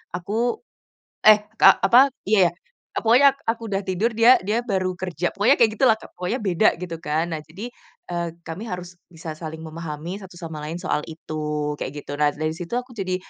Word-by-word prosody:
aku" 220 Hz, +7 st, -2 dB, 0.7 s
eh 210 Hz, -1 st, +8 dB, 0.2 s
Kak -, -, +7 dB
apa 255 Hz, +7 st, +7 dB, 0.2 s
iya, 190 Hz, -5 st, +5 dB, 0.5 s
e -, -, +1 dB
pokoknya 250 Hz, +5 st, +6 dB, 0.2 s
aku 225 Hz, 0 st, -1 dB
udah 195 Hz, -, +1 dB
tidur 195 Hz, +6 st, 0 dB
dia 235 Hz, +3 st, +7 dB
dia 215 Hz, +4 st, 0 dB
baru 190 Hz, -4 st, 0 dB
kerja. 180 Hz, -1 st, -2 dB
Pokoknya 230 Hz, +8 st, +4 dB
kayak 225 Hz, -2 st, +5 dB
gitulah 245 Hz, -4 st, +5 dB
Kak, -, -, -13 dB
pokoknya 185 Hz, +8 st, -2 dB
beda 190 Hz, +2 st, +3 dB
gitu 170 Hz, -2 st, -5 dB
kan. 160 Hz, +3 st, -1 dB
Nah 155 Hz, -, -3 dB
jadi, 200 Hz, +11 st, -8 dB, 0.4 s
eee, 170 Hz, -1 st, -2 dB, 0.2 s
kami 180 Hz, +8 st, -6 dB
harus 180 Hz, 0 st, -7 dB
bisa 165 Hz, -1 st, -7 dB
saling 160 Hz, -1 st, -7 dB
memahami 165 Hz, +3 st, -6 dB
satu 185 Hz, -2 st, -12 dB
sama 160 Hz, -3 st, -7 dB
lain 160 Hz, +3 st, -5 dB
soal 185 Hz, -, 0 dB
itu, 150 Hz, -2 st, -4 dB
kayak 130 Hz, -, -4 dB
gitu. -, -, -9 dB
Nah 150 Hz, -1 st, +3 dB
dari 155 Hz, +1 st, -2 dB
situ 175 Hz, +6 st, -7 dB
aku 250 Hz, 0 st, -5 dB
jadi 185 Hz, -2 st, -1 dB
180 Hz, 190 wpm, -23 LUFS, 160-220 Hz, 0.7 s, eh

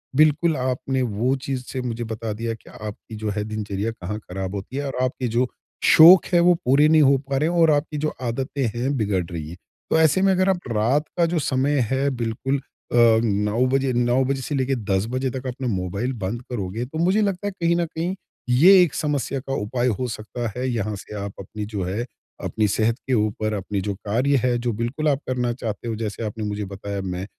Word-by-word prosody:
बिल्कुल 155 Hz, +2 st, +4 dB
आपने 130 Hz, +1 st, -1 dB
वो 120 Hz, +4 st, 0 dB
चीज़ 130 Hz, -2 st, -3 dB
से 130 Hz, -, -3 dB
मुझे 120 Hz, -1 st, -3 dB
बता 110 Hz, -1 st, -4 dB
दिया 115 Hz, +2 st, -3 dB
कि 115 Hz, -, -14 dB
आपकी 105 Hz, +1 st, -8 dB
जो 105 Hz, -, 0 dB
है 105 Hz, 0 st, -2 dB
दिनचर्या 105 Hz, 0 st, -3 dB
कहाँ 105 Hz, -1 st, -5 dB
ख़राब 95 Hz, 0 st, -5 dB
होती 105 Hz, +7 st, -6 dB
है 145 Hz, -, -2 dB
और 135 Hz, -, -4 dB
आपके 130 Hz, 0 st, -1 dB
जो 125 Hz, +1 st, +3 dB, 0.4 s
शौक 170 Hz, +3 st, +9 dB
है 175 Hz, -, +6 dB
वो 175 Hz, +1 st, +6 dB
पूरे 140 Hz, +4 st, +5 dB
नहीं 160 Hz, 0 st, +6 dB
हो 140 Hz, -1 st, +5 dB
पा 135 Hz, -, +1 dB
रहे 155 Hz, +4 st, +1 dB
हैं 175 Hz, -, -2 dB
और 160 Hz, -1 st, +6 dB
आपकी 150 Hz, +1 st, 0 dB
जो 155 Hz, -, -1 dB, 0.2 s
आदतें 135 Hz, +3 st, -3 dB
हैं 130 Hz, +4 st, -1 dB
बिगड़ 100 Hz, -5 st, 0 dB
रही 80 Hz, -2 st, -5 dB
है। 85 Hz, -, -8 dB, 0.3 s
तो 160 Hz, -, +3 dB
ऐसे 160 Hz, +4 st, +4 dB
में 195 Hz, 0 st, +4 dB
अगर 185 Hz, +1 st, +2 dB
आप 185 Hz, -2 st, +2 dB
रात 120 Hz, +7 st, +2 dB
का 170 Hz, -, +4 dB
जो 170 Hz, -, +2 dB
समय 140 Hz, +1 st, +1 dB
है 135 Hz, +1 st, +2 dB
बिल्कुल 125 Hz, +2 st, -2 dB
अ, 130 Hz, -2 st, -7 dB, 0.3 s
9 105 Hz, +3 st, +1 dB
बजे, 135 Hz, 0 st, +1 dB
9 120 Hz, +2 st, +2 dB
बजे 135 Hz, 0 st, -1 dB
से 145 Hz, -, -3 dB
लेके 135 Hz, 0 st, +1 dB
10 100 Hz, -4 st, -1 dB
बजे 130 Hz, +1 st, -1 dB
तक 130 Hz, 0 st, -5 dB
अपना 130 Hz, +1 st, -4 dB
मोबाइल 100 Hz, +8 st, -2 dB
बंद 115 Hz, +6 st, -3 dB
करोगे 110 Hz, +1 st, -3 dB
तो 155 Hz, +5 st, -7 dB
मुझे 190 Hz, +5 st, +3 dB
लगता 200 Hz, -1 st, -1 dB
है -, -, -1 dB
कहीं 170 Hz, 0 st, +3 dB
न 170 Hz, 0 st, +1 dB
कहीं 165 Hz, +4 st, -3 dB, 0.4 s
ये 185 Hz, +5 st, +8 dB
एक 160 Hz, -, -1 dB
समस्या 140 Hz, -3 st, -1 dB
का 135 Hz, +1 st, -5 dB
उपाय 120 Hz, +4 st, -1 dB
हो 125 Hz, -, -1 dB
सकता 115 Hz, +2 st, -5 dB
है। 130 Hz, -, -1 dB
यहाँ 105 Hz, -3 st, -2 dB
से 105 Hz, +2 st, -9 dB
आप 100 Hz, -1 st, -5 dB
अपनी 105 Hz, +2 st, -6 dB
जो 105 Hz, -3 st, -4 dB
है 100 Hz, +7 st, -2 dB, 0.4 s
अपनी 110 Hz, -1 st, 0 dB
सेहत 110 Hz, +3 st, +1 dB
के 130 Hz, -, 0 dB
उपर 110 Hz, -1 st, 0 dB
अपनी 100 Hz, -1 st, -2 dB
जो 100 Hz, +1 st, -2 dB
कार्य 120 Hz, +8 st, 0 dB
है 125 Hz, -1 st, +2 dB
जो 120 Hz, 0 st, -1 dB
बिल्कुल 120 Hz, +8 st, -2 dB
आप 140 Hz, -1 st, +1 dB
करना 125 Hz, -2 st, 0 dB
चाहते 115 Hz, -2 st, -5 dB
हो, 115 Hz, -, -2 dB
जैसे 110 Hz, 0 st, -4 dB
आपने 110 Hz, +1 st, -4 dB
मुझे 105 Hz, 0 st, -3 dB
बताया 100 Hz, +1 st, -5 dB
मैं 95 Hz, 0 st, -4 dB
125 Hz, 225 wpm, -23 LUFS, 105-140 Hz, 0.4 s, शौक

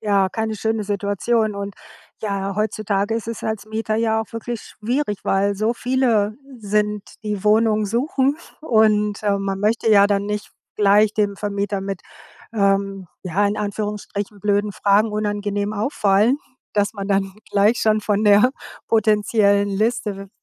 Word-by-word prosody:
Ja, 200 Hz, -3 st, +2 dB
keine 220 Hz, +2 st, -2 dB
schöne 220 Hz, 0 st, -1 dB
Situation. 205 Hz, +2 st, 0 dB
Und 200 Hz, 0 st, -5 dB, 0.5 s
ja, 195 Hz, -1 st, -2 dB
heutzutage 210 Hz, 0 st, -1 dB
ist 225 Hz, -1 st, -3 dB
es 230 Hz, -2 st, -5 dB
als 220 Hz, -1 st, -3 dB
Mieter 220 Hz, 0 st, -2 dB
ja 220 Hz, -1 st, +1 dB
auch 220 Hz, -, -8 dB
wirklich 230 Hz, 0 st, -5 dB
schwierig, 230 Hz, -1 st, -3 dB
weil 200 Hz, +1 st, +1 dB
so 215 Hz, +4 st, 0 dB
viele 235 Hz, -5 st, +1 dB, 0.2 s
sind, 210 Hz, 0 st, 0 dB, 0.2 s
die 210 Hz, -2 st, -3 dB
Wohnungen 215 Hz, 0 st, +3 dB
suchen 265 Hz, +5 st, +1 dB, 0.2 s
und, 215 Hz, -6 st, +2 dB
äh, 200 Hz, -1 st, +2 dB
man 195 Hz, 0 st, -3 dB
möchte 225 Hz, +2 st, +1 dB
ja 200 Hz, -1 st, +7 dB
dann 200 Hz, 0 st, 0 dB
nicht 210 Hz, 0 st, -4 dB, 0.3 s
gleich 210 Hz, +1 st, +4 dB
dem 205 Hz, -2 st, 0 dB
Vermieter 200 Hz, -1 st, -2 dB
mit, 195 Hz, -1 st, -4 dB, 0.5 s
ähm, 195 Hz, -2 st, 0 dB, 0.2 s
ja, 195 Hz, +3 st, +1 dB
in 205 Hz, -, -1 dB
Anführungsstrichen 205 Hz, 0 st, -4 dB
blöden 205 Hz, +1 st, +1 dB
Fragen 205 Hz, +3 st, +2 dB
unangenehm 205 Hz, -1 st, -2 dB
auffallen, 210 Hz, +2 st, +2 dB, 0.3 s
dass 205 Hz, -1 st, +1 dB
man 200 Hz, -1 st, -5 dB
dann 195 Hz, -1 st, +1 dB, 0.2 s
gleich 210 Hz, +4 st, +3 dB
schon 215 Hz, 0 st, +2 dB
von 210 Hz, 0 st, 0 dB
der 210 Hz, +4 st, +6 dB, 0.4 s
potenziellen 210 Hz, -2 st, +3 dB
Liste 205 Hz, -1 st, -1 dB
210 Hz, 145 wpm, -21 LUFS, 200-220 Hz, 0.5 s, ja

